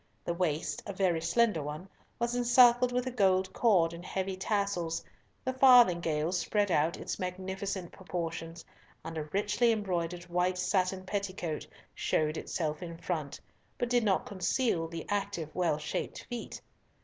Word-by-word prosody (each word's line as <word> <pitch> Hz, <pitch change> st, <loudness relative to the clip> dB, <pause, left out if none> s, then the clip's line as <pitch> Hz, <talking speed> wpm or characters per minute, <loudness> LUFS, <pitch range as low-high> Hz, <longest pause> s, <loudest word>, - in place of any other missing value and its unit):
The 170 Hz, -, 0 dB
waist, 170 Hz, -3 st, -1 dB
a 200 Hz, -, -4 dB
very 185 Hz, -4 st, +1 dB
slender 185 Hz, +1 st, +2 dB
one, 150 Hz, +5 st, -6 dB, 0.3 s
was 235 Hz, 0 st, -1 dB
encircled 245 Hz, 0 st, +5 dB
with 250 Hz, 0 st, 0 dB
a 255 Hz, -, -2 dB
gold 190 Hz, -4 st, +2 dB
cord 180 Hz, -8 st, +3 dB
and 170 Hz, +1 st, -9 dB
heavy 190 Hz, +1 st, -3 dB
tassels, 190 Hz, -4 st, -1 dB, 0.4 s
the 260 Hz, -, 0 dB
farthingale 180 Hz, -, +5 dB
spread 200 Hz, +2 st, +1 dB
out 165 Hz, +2 st, +2 dB
its -, -, -5 dB
magnificent 190 Hz, 0 st, -4 dB
proportions, 165 Hz, -2 st, -5 dB, 0.4 s
and 165 Hz, 0 st, -6 dB
a 155 Hz, -1 st, -3 dB
richly 210 Hz, +7 st, +2 dB
embroidered 180 Hz, -5 st, -2 dB
white 180 Hz, +1 st, 0 dB
satin 185 Hz, 0 st, 0 dB
petticoat 185 Hz, -5 st, -3 dB, 0.3 s
showed 155 Hz, 0 st, 0 dB
itself 155 Hz, -2 st, -3 dB
in 170 Hz, -2 st, -6 dB
front, 155 Hz, -5 st, -4 dB, 0.4 s
but 245 Hz, 0 st, -2 dB
did 245 Hz, -1 st, +3 dB
not 195 Hz, -3 st, +2 dB
conceal 185 Hz, -2 st, 0 dB
the 165 Hz, 0 st, -6 dB
active, 200 Hz, -6 st, -2 dB
well 170 Hz, -4 st, +1 dB
shaped 150 Hz, -, -4 dB
feet. 240 Hz, -1 st, -6 dB
185 Hz, 150 wpm, -31 LUFS, 165-205 Hz, 0.4 s, encircled